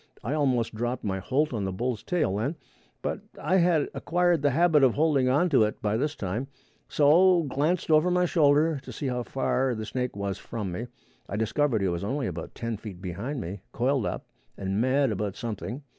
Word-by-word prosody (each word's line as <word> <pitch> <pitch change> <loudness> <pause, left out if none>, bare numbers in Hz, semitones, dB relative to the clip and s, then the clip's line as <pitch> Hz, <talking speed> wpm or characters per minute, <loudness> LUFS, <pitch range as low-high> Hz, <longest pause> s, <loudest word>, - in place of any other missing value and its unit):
I - - -2
almost 130 -7 +1
dropped 120 +3 -3
my 95 -2 -2
holt 135 +8 0
on 105 -4 -2
the 95 - -2
bull's 120 +4 -2
tail 155 - 0
then, 135 +10 -1 0.5
but - - -2 0.2
I 175 +6 +2
had 170 -4 +3
acquired 175 -2 +1
the 145 - +3
habit 155 0 +4
of 130 -3 +4
holding 145 -4 +3
on 145 +8 +3
to 135 -7 +4
it 105 - -1
by 105 0 0
this 150 +6 -1
time, 105 +7 -3 0.4
so 170 +4 +5
glanced 155 +5 0
over 155 +3 +5
my 180 0 +2
shoulder 155 -1 +3
to - - -10
see 145 - -6
how 125 -1 -1
far 130 0 0
the 110 0 -5
snake 125 +1 -3
was 100 0 -3
from 100 -2 -5
me. 115 +8 -4 0.4
I 100 - -3
discovered 110 +1 +1
he - - +2
was 85 0 -2
only 135 +6 -1
about - - -6
ten 115 -2 -3
feet 100 -4 -9
behind 100 - -4
me, 95 +4 -6
coiled 130 -1 +1
up - - -4 0.3
and 95 +2 -1
mad 130 +1 +2
about 100 -1 -2
something. 120 +4 -5
130 Hz, 205 wpm, -27 LUFS, 105-150 Hz, 0.5 s, so